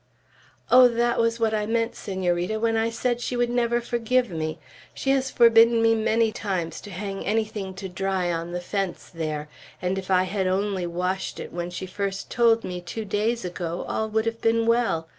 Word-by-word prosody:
"Oh, 250 0 +9
that 240 0 +1
was 230 0 +1
what 225 -1 +1
I 210 -1 0
meant, 230 +1 0
Senorita, 185 +1 -1
when 225 0 +1
I 225 +1 +1
said 240 +1 -1
she 250 - -2
never 240 -1 +1
would 240 - 0
forgive 240 -1 0
me. 155 -1 -3 0.4
She 270 - 0
has 270 -1 +1
forbidden 230 0 +6
me 225 0 +4
many 225 0 +2
times 185 -6 -3
to 205 - -10
hang 195 +1 -5
anything 210 -2 -2
to 195 0 -6
dry 185 -1 -1
on 165 0 -3
the 175 0 -3
fence 195 0 -3
there; 155 -2 -3 0.3
and 185 +1 -1
if 190 - -9
I 185 -1 +4
had 190 0 -1
only 190 -1 0
washed 180 +2 -2
it - - -7
when 175 0 -3
she 175 +1 -5
first 195 +1 -4
told 230 -1 +3
me, 180 -1 -5
two 215 +5 -6
days 215 +2 -1
ago, 175 -1 -4
all 220 0 -1
would 220 +1 0
have 230 0 -3
been 230 0 +2
well. 230 -9 +1
210 Hz, 200 wpm, -25 LUFS, 180-230 Hz, 0.4 s, Oh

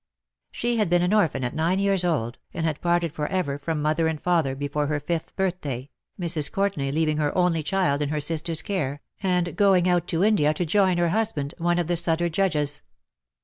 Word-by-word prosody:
She 240 0 -1
had 210 -5 +1
been 175 0 +3
an 180 +3 +1
orphan 165 -11 +2
at 125 - -2
nine 165 +4 0
years 195 -2 +2
old, 130 -9 -1 0.2
and 165 - -2
had 155 -3 -2
parted 175 -2 +1
for 150 -3 -3
ever 170 -7 -2
from 150 0 -3
mother 155 +2 +1
and 160 -1 -2
father 165 -7 +1
before 145 +1 -2
her 150 0 -1
fifth 160 +3 -4
birthday^ 150 -9 -3 0.3
Mrs. 165 -4 +2
Courtenay 195 -9 -1
leaving 155 +1 0
her 150 +1 -1
only 175 -3 +2
child 150 -4 0
in 145 - -1
her 150 0 -1
sister's 160 +2 -1
care, 145 -9 -3 0.2
and 180 -2 0
going 195 -4 +4
out 175 -1 +1
to 165 +2 0
India 155 -8 +3
to 175 - -1
join 185 +1 +2
her 175 -1 +2
husband, 165 -8 -1
one 175 +1 +1
of 175 - 0
the 175 +2 0
Sudder 170 0 +3
Judges. 150 -5 0
165 Hz, 205 wpm, -24 LUFS, 150-180 Hz, 0.3 s, going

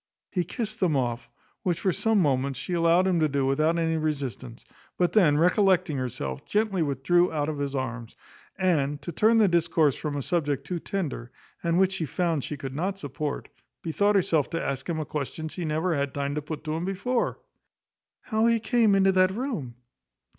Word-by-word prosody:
He 180 - 0
kissed 215 +4 -4
them 165 -6 +2
off, 120 -2 -2 0.3
which, 175 -3 -1
for 190 - +2
some 220 +5 +1
moments, 135 -3 +1
she 140 +6 -4
allowed 170 +2 +4
him 185 -3 +2
to 155 -1 +2
do 140 -1 0
without 155 +5 +2
any 165 -1 +1
resistance; 135 -6 -4 0.3
but 175 -1 +1
then 165 -9 +5
recollecting 180 -2 +3
herself, 120 - -4
gently 210 -3 +1
withdrew 160 +5 +2
out 150 -1 -1
of 150 -2 -4
his 140 -1 -2
arms; 125 -3 -4 0.4
and, 145 -6 +1
to 175 - -4
turn 220 +8 +3
the 215 -2 +5
discourse 165 -4 +2
from 150 -2 -4
a 140 - -3
subject 145 -4 -1
too 180 -2 -3
tender, 150 -11 -4 0.3
and 170 0 +1
which 190 0 +4
she 175 -5 -3
found 165 -3 -1
she 150 - -5
could 135 -2 -6
not 185 +7 -2
support, 145 -2 -4 0.3
bethought 200 +5 +1
herself 165 -6 +2
to 165 - -3
ask 135 +3 -3
him 165 -2 -1
a 155 - -3
question 150 +2 -4
she 175 +2 -5
never 160 +3 0
had 140 -3 -2
time 140 0 -1
to 150 - -2
put 150 +1 -6
to 155 -1 -3
him 165 +2 -2
before, 200 +7 -1 0.8
"How 220 -1 +1
he 230 -1 +3
came 225 -3 +3
into 195 0 +4
that 185 0 +4
room?" 195 - -4
160 Hz, 195 wpm, -26 LUFS, 140-185 Hz, 0.8 s, then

